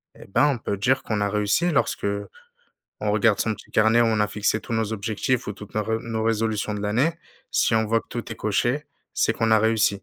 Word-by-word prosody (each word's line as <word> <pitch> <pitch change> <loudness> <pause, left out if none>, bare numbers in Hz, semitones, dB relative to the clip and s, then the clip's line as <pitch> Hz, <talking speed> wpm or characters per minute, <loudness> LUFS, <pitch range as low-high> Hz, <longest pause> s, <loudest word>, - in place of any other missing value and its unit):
Eh - - -13
ben, 120 +9 +3
on 140 -4 +1
peut 100 - -3
dire 130 +6 +2
qu'on 105 -2 -2
a 100 - +1
réussi 105 - +1
lorsqu'on 100 -8 -1 0.7
regarde 105 0 +2
son 110 -1 0
petit - - -16
carnet, 110 +2 +4
où - - +3
on 110 -2 +1
a 105 - +3
fixé 105 +1 0
tous 115 - -5
nos 110 -1 -1
objectifs 110 +4 -1
ou 105 - -3
toutes 105 0 -12
nos 110 - +1
ré 110 +1 -1
nos 115 -1 -3
résolutions 110 -1 0
de 105 - -4
l'année. 120 +11 +1 0.4
Si 115 - +2
on 110 -1 +2
voit 115 +1 +2
que - - -24
tout 120 -1 -5
est - - -3
coché, 120 +8 0 0.3
c'est 115 - +2
qu'on 115 -1 0
a 110 - +6
réussi. 110 -3 +2
110 Hz, 235 wpm, -24 LUFS, 105-115 Hz, 0.7 s, a